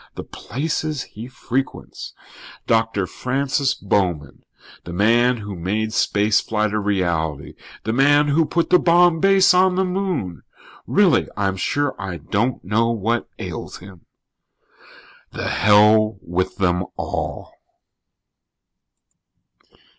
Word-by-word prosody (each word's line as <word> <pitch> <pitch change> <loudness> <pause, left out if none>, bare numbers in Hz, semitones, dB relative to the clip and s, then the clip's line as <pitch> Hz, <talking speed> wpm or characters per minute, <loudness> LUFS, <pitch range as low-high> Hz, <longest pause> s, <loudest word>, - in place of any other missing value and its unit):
The - - -6
places 150 +1 -4
he 110 +3 -10
frequents. 130 +1 -5 0.5
Doctor 115 -3 +1
Francis 135 +5 -1
Bowman, 90 -8 -2 0.4
the 85 - -8
man 120 +6 +3
who 100 -2 -7
made 105 +5 -2
space 105 0 +2
flight 110 -1 -1
a 105 - 0
reality. 85 -7 -2 0.3
The 110 - -2
man 145 +3 +4
who 155 +2 +2
put 170 -1 -1
the 180 - +6
Bomb 175 -1 +4
Base 195 +1 +5
on 185 0 +3
the 190 +1 +1
Moon! 180 - -3 0.5
Really, - - +3
I'm 100 -2 0
sure 145 +9 -1
I 95 -3 -5
don't 115 +8 -2
know 115 +4 +1
what 115 +1 -1
ails - - -7
him." 95 -2 -15 1.3
The - - -4
hell 105 0 +4
with 90 +2 -2
them 90 -2 +1
all. - - -5
110 Hz, 115 wpm, -21 LUFS, 95-140 Hz, 1.3 s, the